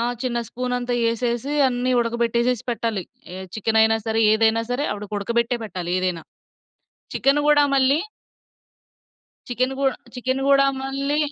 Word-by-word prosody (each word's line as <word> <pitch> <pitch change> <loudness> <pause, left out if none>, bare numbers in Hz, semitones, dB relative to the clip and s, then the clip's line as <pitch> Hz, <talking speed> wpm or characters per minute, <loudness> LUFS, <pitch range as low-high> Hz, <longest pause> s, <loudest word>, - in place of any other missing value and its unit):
ఆ! - - 0 0.2
చిన్న 245 -2 -1
స్పూనతా 250 0 -2
యేసేసి, 235 +3 -1 0.2
అన్నీ 250 0 -1
ఉడకబెట్టేసేసి 235 +1 0
పెట్టాలి. 225 -4 -2 0.3
ఏ - - -7 0.2
చికెనయినా 220 +1 +3
సరే, 225 0 +1
ఏదైనా 225 +1 +3
సరే 260 +4 -1
ఆవిడకుడకబెట్టే 215 +4 -2
పెట్టాలి 180 -4 -5
ఏదైనా. 180 -3 -2 0.9
చికెను 280 +2 +2
గూడా 295 -1 +5
మళ్ళీ... 270 +2 +3 1.5
చికెను 255 +2 -1
గూ 275 - -1 0.3
చికెను 260 +2 -2
గూడా 275 0 +5 0.2
మళ్ళీ 275 +2 -2
240 Hz, 120 wpm, -22 LUFS, 225-260 Hz, 1.5 s, గూడా